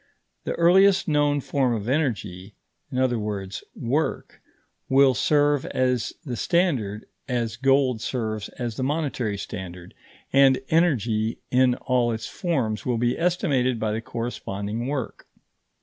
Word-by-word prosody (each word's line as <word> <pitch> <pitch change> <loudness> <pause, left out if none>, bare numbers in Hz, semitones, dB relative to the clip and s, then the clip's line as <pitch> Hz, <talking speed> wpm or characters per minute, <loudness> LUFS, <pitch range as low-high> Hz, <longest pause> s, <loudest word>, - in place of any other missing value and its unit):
The - - -1
earliest 190 +3 +5
known 145 -2 +2
form 130 -3 0
of 105 -1 -5
energy, 105 - -2 0.4
i.e. 105 -7 -1 0.2
work, 140 +7 -2 0.5
will 135 0 +5
serve 145 0 +2
as 125 -2 0
the 125 -4 -3
standard 125 - 0 0.2
as 115 -3 -1
gold 135 -1 +2
serves 110 -5 -3
as 120 -3 -5
the 130 - -2
monetary 130 -7 -1
standard, 90 -3 -8 0.4
and 135 -1 +5
energy 115 - +2
in 125 -1 +4
all 125 -2 +1
its 110 -1 -4
forms 125 - -2
will 125 -2 0
be 120 +1 +1
estimated 145 - +1
by 110 -1 -1
the 110 +1 -2
corresponding 115 -1 -4
work. 135 -4 -4
125 Hz, 125 wpm, -24 LUFS, 110-140 Hz, 0.5 s, earliest